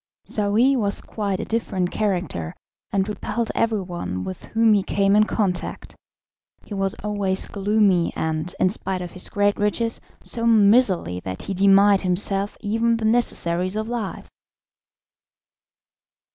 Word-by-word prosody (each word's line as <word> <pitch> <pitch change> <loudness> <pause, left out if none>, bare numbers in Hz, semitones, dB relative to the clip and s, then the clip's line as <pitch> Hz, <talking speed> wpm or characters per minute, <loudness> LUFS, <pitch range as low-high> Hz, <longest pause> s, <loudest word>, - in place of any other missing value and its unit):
Saouy 220 +6 +2
was 205 -5 0
quite 200 -3 -3
a 220 - -3
different 195 -5 -2
character, 175 - -2 0.4
and 195 -1 0
repelled 220 +2 -3
everyone 180 - -2
with 95 0 -7
whom 225 -1 +3
he 205 - +3
came 195 +1 +1
in 215 0 +5
contact; 190 -5 -3 0.7
he - - -8
was 195 -1 0
always 200 -2 -1
gloomy, 200 -3 +2
and, 160 +2 -3
in 185 - +4
spite 185 -2 -3
of 175 - -7
his 185 - -6
great 205 0 +1
riches, 225 +3 0 0.2
so 230 0 -1
miserly 205 - +4
that 95 0 -6
he 195 - -4
denied 195 +1 +5
himself 195 +2 0
even 230 +2 +1
the 225 - -3
necessaries 185 -5 +1
of 220 0 -2
life. 230 -4 -4
200 Hz, 135 wpm, -22 LUFS, 185-220 Hz, 0.7 s, in